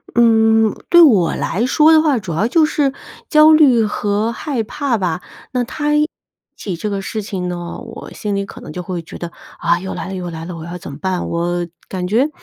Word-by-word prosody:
嗯， 225 -2 +4
对 345 0 +7
我 205 - +5
来 185 - -1
说 305 +4 +5
的 315 - +7
话， 295 -5 +2
主 190 -5 -6
要 165 +8 +1
就 320 +5 +4
是 290 -3 +1 0.4
焦 305 0 +6
虑 270 -7 +5
和 210 +1 -1
害 245 +1 -3
怕 260 +3 -2
吧。 180 -4 -2 0.3
那 250 -1 0
他 295 +4 -1
一 300 - +4
提 - - -33 0.5
起 190 -4 -5
这 210 - -4
个 200 -1 -3
事 215 +3 -4
情 190 -3 -4
呢， 175 -1 -5
我 230 -1 -9
心 210 -1 -3
里 200 0 -1
可 - - -11
能 - - -9
就 180 - -5
会 175 -1 -5
觉 165 - -10
得： 170 - -6 0.3
“啊， 170 - +2
又 190 +1 -5
来 170 - -5
了， 190 - -5
又 180 -2 -5
来 165 -1 -7
了， 180 -1 -6
我 160 - -8
要 175 +1 -7
怎 - - -9
么 140 - -9
办？” 185 +1 -2
我 175 +1 -1 0.2
感 185 -1 -3
觉 240 +9 +2
210 Hz, 245 characters per minute, -18 LUFS, 180-250 Hz, 0.5 s, 对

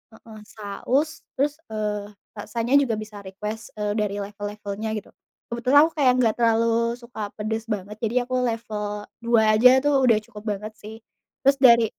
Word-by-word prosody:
Heeh, 220 -1 -13
saus 255 +10 -2
terus, 290 +3 0
eee, 210 -1 -3 0.3
rasanya 230 +5 -2
juga 240 -6 +1
bisa 215 -1 -8
request, 210 +3 -7
eee, 210 -1 -2
dari 205 -1 -1
level-levelnya 205 +1 -5
gitu. 210 - -7 0.4
Kebetulan 250 +4 +2
aku 330 - -3
kayak 260 -3 +5
enggak 230 -4 +2
terlalu 230 0 +2
suka 235 -2 -10
pedes 220 +1 -3
banget, 210 -1 -4
jadi 230 +1 -2
aku 255 +1 -3
level 220 -2 -3 0.3
2 235 -1 +3 0.2
aja 250 +3 +8
tuh 290 0 +3
udah 230 -3 +5
cukup 210 0 -12
banget 215 +2 -7
sih. 215 +1 -9 0.5
Terus 275 +1 +4
dari 235 -3 +7
220 Hz, 160 wpm, -24 LUFS, 210-235 Hz, 0.5 s, aja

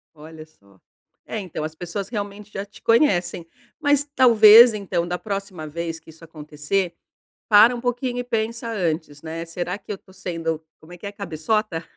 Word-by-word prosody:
Olha 155 +1 -12
só. 100 -11 -26 0.5
É, - - -5
então, 180 -5 -6
as 155 0 -5
pessoas 180 +4 -5
realmente 205 -2 -6
já 195 0 -5
te 205 - -18
conhecem. 180 - +2 0.3
Mas 290 -2 +3
talvez, 230 -2 +8
então, 185 -5 -2
da 180 0 -2
próxima 195 -6 -5
vez 165 +1 -5
que - - -19
isso 160 +1 -16
acontecer, 160 +3 -3 0.6
para 220 +4 +7
um 235 - -6
pouquinho 245 0 -2
e - - -2
pensa 230 -1 -3
antes, 160 -7 -3
né: 165 +1 -6
"Será 175 +3 -4
que - - -10
eu 205 - -2
estou 190 0 -20
sendo" 165 -3 -4 0.2
como 160 +3 -15
é - - -10
que 180 - -12
é, - - -6
'cabeçota'?"; 200 -1 -2
185 Hz, 180 wpm, -22 LUFS, 165-215 Hz, 0.6 s, talvez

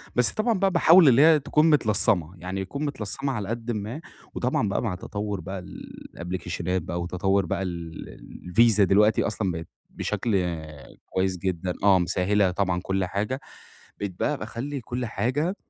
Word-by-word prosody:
بس 125 -1 +3
طبعًا 215 -2 0
بَقى 195 -1 +2
باحاول 170 -1 +6
اللي 130 +2 +6
هي 155 -1 +7
تكون 150 +3 +2
متلصمة، 105 - +2
يعني 95 +3 -4
يكون 140 +10 -4
متلصمة 135 +1 -3
على 105 -4 -4
قدٍ 120 +1 -3
ما، 110 +8 -4 0.3
وطبعًا 125 -4 0
بَقى - - -1
مع 105 -6 -1
تطور 100 +1 -4
بَقى 95 0 -6
ال 90 - -10 0.2
الأبلكيشنات 90 0 -3
بَقى 85 +2 -4
وتطور 95 +2 0
بَقى 95 +3 -2
ال 85 -2 -7 0.4
الVisa 115 -2 +5
دلوقتي 105 +3 +4
أصلًا 100 -3 -1
بقت 80 -1 -6 0.2
بشكل 95 -6 -1 0.5
كويس 95 0 -1
جدًا 90 0 -2
آه، 95 -2 +6
مِسَهِّلة 95 +2 +1
طبعًا 90 -2 0
كل 95 0 0
حاجة 105 +8 -2 0.6
بقيت 100 -3 -5
بَقى 150 -2 0
باخلِّي 130 +5 -5
كل 125 +2 -4
حاجة 130 - -1
100 Hz, 160 wpm, -25 LUFS, 90-125 Hz, 0.6 s, هي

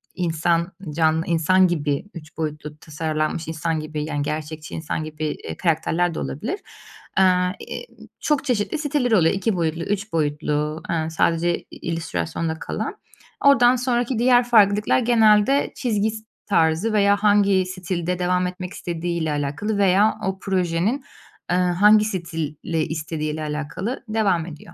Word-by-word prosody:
insan 170 0 0 0.2
can 160 0 +2
insan 180 +3 +3
gibi 145 -2 -1
3 160 -2 -11
boyutlu 150 -1 -4
tasarlanmış 155 +1 -3
insan 160 0 -2
gibi, 155 -1 -4
yani, 145 -2 -2
gerçekçi 155 +1 -5
insan 160 0 -3
gibi, 155 0 -5
eee, 150 - -5
karakterler 170 0 +1
de - - -4
olabilir. 240 - -4 0.6
Eee, 190 - +6
ııı, 180 0 +3 0.7
çok 295 -2 0
çeşitli 245 +4 0
siteleri 290 -6 +1
oluyor. 165 -4 +4
2 195 +2 0
boyutlu, 165 -1 -1
3 200 -1 -3
boyutlu, 150 0 -1
eee, 160 -1 -1
sadece 170 +2 +1
i - - -21
illüstrasyonda 165 - -3
kalan. - - -4 0.5
Oradan 255 -3 +6
sonraki 245 -1 0
diğer 245 0 +5
farklılıklar 210 -2 +4
genelde 230 +2 +4
çizgi 220 -4 0
s 220 0 -8 0.2
tarzı 165 +3 +2
veya 200 -1 +4
hangi 205 -2 +3
stilde 180 -1 -3
devam 180 0 +1
etmek 180 0 -6
istediğiyle 170 -2 -3
alakalı 150 +9 -2
veya 200 +2 +4
o 190 0 -2
projenin, 190 +6 0 0.5
eee, - - +3
hangi 205 +4 +5
stili 165 -7 -4 0.3
istediğiyle 155 -1 -4
alakalı 155 - -4
devam 195 -7 +1
ediyor. 165 0 -11
175 Hz, 140 wpm, -22 LUFS, 160-205 Hz, 0.7 s, Eee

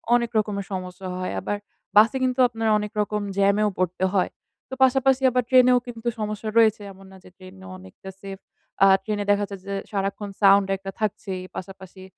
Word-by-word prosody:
অনেক 235 -1 0
রকমের 200 -2 -1
সমস্যা 185 0 -6
হয়। 185 - -3
আবার 205 - -3 0.4
বাসে 225 +5 +6
কিন্তু 255 0 -1
আপনার 225 -2 -2
অনেক 210 0 -4
রকম 210 0 -2 0.2
জ্যামেও 200 +2 +3
পরতে 180 0 -2
হয়। 190 -2 +1 0.4
তো - - -9
পাশাপাশি 265 0 +3
আবার 250 0 0
ট্রেনেও 255 -1 +6
কিন্তু 235 0 -7
সমস্যা 215 0 -4
রয়েছে 220 -2 +4
এমন 195 0 -16
না 190 - -14
যে - - -15
ট্রেনে 95 - -14
অনেকটা 95 - -13
সেফ। 195 -1 -8 0.4
অ্যা 195 - +6
ট্রেনে 205 0 -2
দেখা 205 0 +1
যায় 200 - -8
যে 200 - -5 0.2
সারাক্ষণ 200 +1 -3
সাউন্ড 195 0 +5
একটা 195 0 -8
থাকছেই। 205 -3 -3
পাশাপাশি 190 0 -10
205 Hz, 175 wpm, -23 LUFS, 190-225 Hz, 0.4 s, বাসে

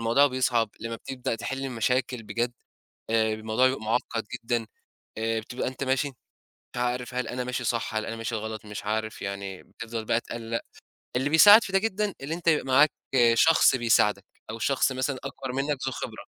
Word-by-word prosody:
الموضوع 115 +5 +4
بيصعَب 125 -4 +1
لمّا 115 +1 -4
بتبدأ 130 0 -4
تِحل 135 +4 -4
المشاكل 125 0 -1
بجَد، 115 +3 -2 0.6
آآ 110 -1 +2
الموضوع 110 +4 +2
بيبقى 130 -3 -2
معقّد 115 0 -1
جدًا، 120 -1 -2 0.5
آآ 115 0 0
بتبقى 120 +3 -4
أنت 130 +2 -4
ماشي 135 +2 +1
مش 135 - -16 0.6
عارف 125 +1 -2
هل 125 -1 -2
أنا 125 +1 -3
ماشي 125 0 -3
صح؟ 115 -1 -1
هل 110 0 -1
أنا 115 - -4
ماشي 115 0 -3
غلط؟ 110 0 -5
مش 105 -1 -7
عارف 110 +1 -2
يعني 100 -1 -5
بتفضَل 115 -1 -7
بقى 115 +2 +1
تقلّق، 115 -1 -4 0.5
اللي 130 +3 +1
بيساعد 205 +8 +9
في - - -6
ده 195 - +5
جدًا 210 -1 -1
اللي 140 +4 -4
أنت 170 0 -9
يبقى 160 -2 +3
معاك 140 +3 +5 0.4
شخص 155 +3 +5
بيساعدك 105 -5 +2 0.2
أو 115 - -6
شخص 135 +3 +2
مثلًا 130 +1 -1
أكبر 135 -1 -6
منك 140 +2 -1
ذو - - 0
خبرة. - - -6
120 Hz, 185 wpm, -27 LUFS, 115-135 Hz, 0.6 s, بيساعد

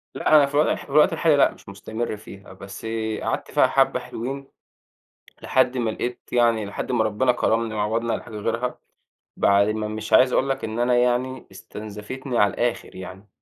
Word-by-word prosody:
لأ، 155 - +3
أنا 145 -2 +7
في 140 - -8
الوضح 150 +2 +1
في - - -19
الوقت 155 +4 +5
الحالي 160 -2 +3
لأ - - +5
مش - - -15
مستمر 110 +3 -5
فيها، 100 -2 -13
بس 100 +3 -10 0.4
قعدت - - -3
فيها - - +4
حبّة - - +2
حلوين 135 +4 -6 1.0
لحد 130 -1 +2
ما 115 -2 0
لقيت 120 +2 -4
يعني 115 -3 +2
لحد 100 +5 -5
ما 110 -3 +2
ربِّنا 125 +4 +2
كرَّمني 115 -2 0
وعوَّضني 115 +2 -1
على - - -3
حاجة 110 -3 -10
غيرها 115 +4 -2 0.6
بعد 100 +1 +4
ما 110 0 -2
مش 110 0 -6
عايز 130 0 +6
أقول 135 - +2
لك 135 0 -2
إن 110 +1 -4
أنا 120 0 +2
يعني 125 +1 0
استنزفتني 110 +6 -6
على 100 -2 +3
الآخِر 120 0 -2
يعني. 95 +2 -10
115 Hz, 185 wpm, -23 LUFS, 105-130 Hz, 1.0 s, أنا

